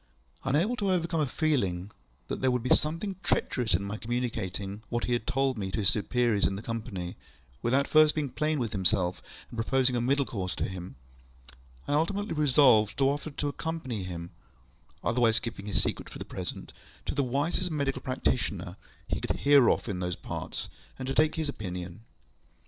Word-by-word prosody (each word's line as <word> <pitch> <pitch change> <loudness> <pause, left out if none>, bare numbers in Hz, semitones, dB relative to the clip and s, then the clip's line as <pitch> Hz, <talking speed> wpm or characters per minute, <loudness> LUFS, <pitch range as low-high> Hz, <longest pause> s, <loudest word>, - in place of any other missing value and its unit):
Unable 160 - +2
to 200 -3 0
overcome 170 -3 +1
a 145 - +1
feeling 105 - 0 0.4
that - - -4
there 130 - +3
would 125 -2 0
be 125 - +4
something 165 +5 0
treacherous 115 - +1
in 95 - 0
my 100 +2 -4
communicating 110 -4 -3
what 120 -1 -1
he 125 - 0
had 120 -2 -1
told 135 -3 +1
me 95 -2 -2
to 95 - -3
his 95 - +5
superiors 115 -1 +2
in 95 - -2
the 100 - -6
Company, 100 -7 -4 0.4
without 130 +4 +2
first 155 -1 +6
being 150 -3 -1
plain 155 +2 0
with 120 -5 -1
himself 95 -2 +2 0.3
and 120 - -8
proposing 130 +2 +2
a 120 - +1
middle 140 +3 +2
course 95 -7 -3
to - - -2
him, 90 -5 -7 0.9
I - - 0
ultimately 195 +7 0
resolved 135 -8 +5
to 135 0 +4
offer 145 +2 -3
to 145 0 -3
accompany 145 -8 -3
him 85 -1 -6 0.7
(otherwise 115 -1 +3
keeping 115 -3 -4
his 105 - +2
secret - - -2
for - - -9
the - - -6
present) - - -6 0.3
to - - -1
the 145 - +1
wisest 145 +8 0
medical 140 -4 -1
practitioner 130 -6 -1 0.4
we - - -1
could - - -1
hear 140 -3 +7
of - - +1
in 95 -4 -2
those 90 -1 -1
parts, - - -5 0.3
and 130 - -5
to - - 0
take 155 +2 +3
his 160 -2 -1
opinion. 90 -8 -5
125 Hz, 185 wpm, -29 LUFS, 100-145 Hz, 0.9 s, hear